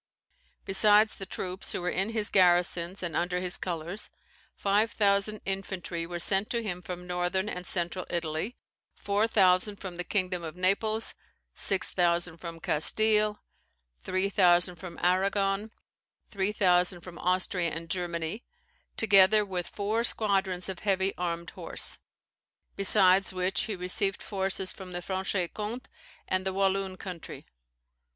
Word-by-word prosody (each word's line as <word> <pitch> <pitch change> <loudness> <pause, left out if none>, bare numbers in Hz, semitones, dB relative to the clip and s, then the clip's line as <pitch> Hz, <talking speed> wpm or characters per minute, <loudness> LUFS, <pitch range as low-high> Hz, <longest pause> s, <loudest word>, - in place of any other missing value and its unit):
Besides 210 +2 +4
the 195 - -8
troops 185 0 -5
who - - -3
were 175 - -3
in 195 +3 -1
his 220 -2 -1
garrisons, 180 0 +3
or 170 -3 -3
under 180 +1 0
his 180 -1 0
colours, 175 +3 -3 0.5
five 205 +3 +1
thousand 200 0 +1
infantry 190 -3 -3
were 175 0 -5
sent 195 +4 +2
to 235 -1 -1
him 180 -4 -4
from 180 0 -7
northern 180 +2 -1
and 180 -3 -5
central 175 0 -2
Italy, 170 +7 -3 0.4
four 205 +2 0
thousand 195 -1 +3
from 185 -3 -8
the 180 - -2
kingdom 185 -2 -1
of 165 -1 -7
Naples, 215 +4 +1 0.4
six 195 -2 0
thousand 175 -1 +1
from 165 -1 -8
Castile, 210 +7 +1 0.6
three 185 +1 0
thousand 180 -2 +3
from 170 -1 -9
Arragon, 195 +3 +1 0.6
three 200 -1 0
thousand 180 -3 +2
from 175 -1 -11
Austria 180 -1 0
and 165 +1 -6
Germany, 175 +3 -3 0.5
together 205 0 +6
with 180 -3 -3
four 215 +3 -1
squadrons 195 -5 +1
of 190 -2 -5
heavy 195 -1 +1
armed 170 -1 -4
horse; - - +2 0.8
besides 195 -1 +4
which 185 +3 0
he 215 -2 -3
received 185 +2 -1
forces 190 -1 -1
from 185 -2 -10
the 175 - -3
Franche 190 -1 -1
Comte 220 +4 -5 0.4
and 185 0 0
the 190 0 -2
Walloon 195 -1 0
country. 180 -4 -8
185 Hz, 140 wpm, -28 LUFS, 175-200 Hz, 0.8 s, together